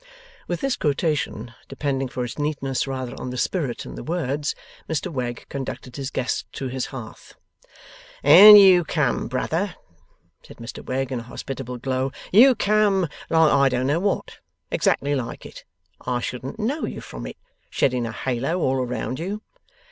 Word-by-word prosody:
With 175 Hz, -, -3 dB
this 270 Hz, -2 st, 0 dB
quotation 145 Hz, -6 st, -1 dB
(depending 135 Hz, -2 st, -2 dB
for 125 Hz, -1 st, -4 dB
its 120 Hz, -, -7 dB
neatness 140 Hz, -3 st, -1 dB
rather 130 Hz, -2 st, -4 dB
on 125 Hz, -, -4 dB
the 125 Hz, -, -5 dB
spirit 140 Hz, -4 st, -1 dB
than -, -, -9 dB
the -, -, -7 dB
words), 150 Hz, -3 st, -2 dB, 0.3 s
Mr 160 Hz, +2 st, -2 dB
Wegg 120 Hz, -3 st, -4 dB
conducted 135 Hz, -2 st, -6 dB
his 135 Hz, -2 st, -4 dB
guest 125 Hz, -3 st, -3 dB
to 135 Hz, -, -4 dB
his 130 Hz, 0 st, -3 dB
hearth. 120 Hz, -5 st, -10 dB, 0.9 s
'And 200 Hz, +9 st, +11 dB
you 190 Hz, -3 st, +7 dB
come, 150 Hz, -5 st, 0 dB
brother,' 165 Hz, +9 st, -2 dB, 0.7 s
said -, -, -15 dB
Mr 115 Hz, +1 st, -8 dB
Wegg, 135 Hz, +1 st, -2 dB
in 130 Hz, -, -2 dB
a -, -, -6 dB
hospitable 125 Hz, +1 st, -6 dB
glow, 130 Hz, +1 st, -2 dB, 0.2 s
'you 250 Hz, +6 st, +7 dB
come 205 Hz, -4 st, +2 dB, 0.2 s
like 160 Hz, -2 st, +4 dB
I 140 Hz, 0 st, +4 dB
don't 125 Hz, 0 st, -1 dB
know 145 Hz, +5 st, +1 dB
what 200 Hz, +2 st, -2 dB, 0.3 s
exactly 145 Hz, +1 st, +1 dB
like 130 Hz, -4 st, -4 dB
it -, -, -11 dB, 0.4 s
I 125 Hz, -1 st, -1 dB
shouldn't 125 Hz, -, -5 dB
know 255 Hz, +8 st, -1 dB
you -, -, -6 dB
from -, -, -8 dB
it -, -, -9 dB, 0.3 s
shedding 125 Hz, -3 st, 0 dB
a -, -, -5 dB
halo 135 Hz, +9 st, -2 dB
all 135 Hz, -5 st, +1 dB
around 125 Hz, +1 st, -3 dB
you. 200 Hz, +6 st, -4 dB
135 Hz, 165 wpm, -23 LUFS, 125-170 Hz, 0.9 s, And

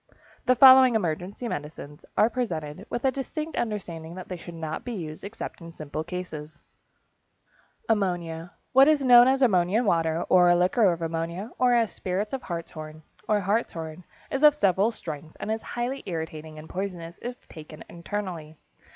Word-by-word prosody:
The 255 Hz, -, +5 dB
following 260 Hz, -1 st, +8 dB
emergency 185 Hz, +4 st, -2 dB
medicines 150 Hz, -4 st, -7 dB
are 215 Hz, -, +6 dB
presented, 190 Hz, -7 st, -4 dB
with 240 Hz, -, -3 dB
a 265 Hz, -, +4 dB
distinct 305 Hz, +4 st, -5 dB
understanding 175 Hz, -7 st, -4 dB
that 185 Hz, -, -9 dB
they 185 Hz, -, -3 dB
should 175 Hz, 0 st, -10 dB
not 160 Hz, -1 st, -5 dB
be 245 Hz, -, -5 dB
used 155 Hz, -6 st, -6 dB
except 200 Hz, -2 st, -7 dB
in 165 Hz, 0 st, -9 dB
simple 155 Hz, -1 st, -5 dB
cases: 160 Hz, -3 st, -7 dB, 1.3 s
=Ammonia.= 175 Hz, -5 st, -1 dB, 0.2 s
What 270 Hz, +2 st, +7 dB
is 300 Hz, -3 st, +3 dB
known 245 Hz, -1 st, +8 dB
as 265 Hz, +1 st, +3 dB
ammonia 195 Hz, 0 st, +3 dB
water, 165 Hz, -4 st, +1 dB
or 175 Hz, -1 st, +6 dB
liquor 185 Hz, +3 st, +3 dB
of 170 Hz, -1 st, -4 dB
ammonia, 165 Hz, +6 st, -3 dB
or 250 Hz, -1 st, +4 dB
as 230 Hz, -2 st, +2 dB
spirits 195 Hz, +5 st, -3 dB
of 265 Hz, -, -2 dB
hartshorn, 155 Hz, -4 st, -7 dB, 0.2 s
or 210 Hz, -1 st, +2 dB
hartshorn, 180 Hz, -5 st, -2 dB, 0.3 s
is 270 Hz, -, -1 dB
of 300 Hz, -1 st, +7 dB
several 200 Hz, -4 st, +3 dB
strengths 155 Hz, -7 st, -8 dB
and 215 Hz, -, -3 dB
is 220 Hz, 0 st, -2 dB
highly 250 Hz, +3 st, -4 dB
irritating 160 Hz, -2 st, -5 dB
and 155 Hz, +1 st, -10 dB
poisonous 175 Hz, -3 st, -5 dB
if 245 Hz, +1 st, -7 dB
taken 155 Hz, -1 st, -11 dB
internally. 170 Hz, -4 st, -6 dB
180 Hz, 160 wpm, -26 LUFS, 165-235 Hz, 1.3 s, following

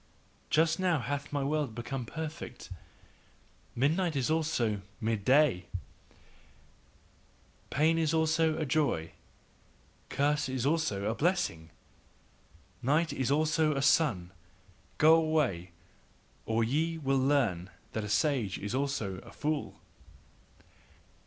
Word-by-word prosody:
Just 165 Hz, +2 st, +2 dB
now 180 Hz, -3 st, +2 dB
hath 140 Hz, +1 st, -4 dB
my 145 Hz, -1 st, -1 dB
world 145 Hz, -4 st, -1 dB
become 120 Hz, +1 st, -5 dB
perfect, 160 Hz, -7 st, -7 dB, 1.0 s
midnight 160 Hz, +6 st, +1 dB
is 135 Hz, +2 st, 0 dB
also 140 Hz, -10 st, 0 dB, 0.2 s
mid 110 Hz, -2 st, -1 dB
day, 130 Hz, -8 st, +3 dB, 2.0 s
Pain 160 Hz, +3 st, +2 dB
is 160 Hz, -2 st, +1 dB
also 160 Hz, 0 st, +2 dB
a 155 Hz, -, -1 dB
joy, 130 Hz, -, 0 dB, 1.0 s
curse 145 Hz, 0 st, +1 dB
is 130 Hz, -1 st, -2 dB
also 145 Hz, -11 st, 0 dB
a 110 Hz, -, +1 dB
blessing, 145 Hz, -, -1 dB, 1.1 s
night 155 Hz, +6 st, +1 dB
is 130 Hz, -2 st, -1 dB
also 155 Hz, +1 st, +2 dB
a 135 Hz, -, -1 dB
sun, 120 Hz, -, +2 dB, 0.7 s
go 155 Hz, +2 st, +7 dB
away! 155 Hz, -, +1 dB, 0.8 s
or 115 Hz, +1 st, +1 dB
ye 160 Hz, +8 st, 0 dB
will 135 Hz, -3 st, +1 dB
learn 120 Hz, -11 st, +1 dB, 0.2 s
that 110 Hz, -, -3 dB
a 105 Hz, -, -5 dB
sage 110 Hz, -3 st, +1 dB
is 105 Hz, +2 st, -5 dB
also 130 Hz, -9 st, -2 dB
a -, -, -14 dB
fool. 150 Hz, 0 st, -3 dB
140 Hz, 115 wpm, -30 LUFS, 115-155 Hz, 2.0 s, go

